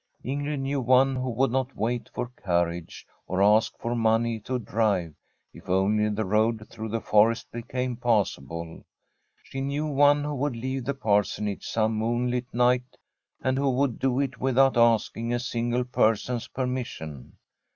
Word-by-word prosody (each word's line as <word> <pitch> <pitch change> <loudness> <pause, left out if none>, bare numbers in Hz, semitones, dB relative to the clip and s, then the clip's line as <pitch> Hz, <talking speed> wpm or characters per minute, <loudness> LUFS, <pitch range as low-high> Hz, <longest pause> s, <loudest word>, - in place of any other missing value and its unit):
Ingrid 145 +2 -2
knew 135 0 -1
one 130 +2 +4
who 130 0 -2
would 125 +1 +1
not 130 +1 -1
wait 120 +2 -2
for 125 - -4
car 90 -8 0
riage, 85 0 -8 0.2
or 95 +2 +1
ask 105 +2 +3
for 115 - -3
money 115 0 +1
to 130 +4 -3
drive, 105 -8 0 0.4
if - - -14
only 105 +3 +2
the 105 +1 -2
road 110 +2 +1
through 110 -1 -6
the 115 +2 -1
forest 110 +2 +2
became 125 +1 -3
passable. 85 - -1 0.6
She 135 - -6
knew 140 +3 -1
one 145 0 +4
who 150 0 -3
would 140 -1 -1
leave 130 +2 -3
the 140 - -1
Parsonage 105 -3 0
some 110 0 +1
moon 120 +2 0
light 125 0 -3
night, 125 +1 +1 0.5
and 130 +1 +1
who 140 0 +2
would 130 -1 0
do 130 -1 +1
it 130 -3 -2
without 135 +1 +3
asking 115 0 +2
a - - -1
single 120 0 -1
person's 120 0 0
permission. 125 - -5
120 Hz, 160 wpm, -26 LUFS, 110-130 Hz, 0.6 s, one